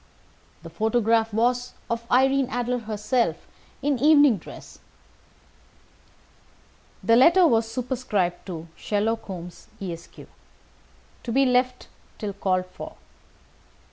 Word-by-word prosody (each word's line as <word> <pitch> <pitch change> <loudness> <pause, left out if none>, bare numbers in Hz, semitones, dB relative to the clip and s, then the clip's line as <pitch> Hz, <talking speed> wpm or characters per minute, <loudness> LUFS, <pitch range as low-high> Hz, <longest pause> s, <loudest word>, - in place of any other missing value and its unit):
The 165 - -10
photograph 225 +3 +1
was 245 +3 0
of 235 0 -4
Irene 270 +1 +3
Adler 245 0 -1
herself 215 -4 -1 0.4
in 280 -3 +1
evening 290 -4 +6
dress, - - -12 2.2
the 230 - +4
letter 340 +9 +6
was 225 -6 +2
superscribed 235 -8 -2
to 170 -3 -6
"Sherlock 220 +2 -1
Holmes, 180 -3 -9
Esq. 170 -4 -7 1.1
To 235 - -5
be 270 +3 +3
left 250 0 +1 0.3
till 205 -2 -4
called 185 -2 0
for." 185 - -10
230 Hz, 105 wpm, -24 LUFS, 200-255 Hz, 2.2 s, evening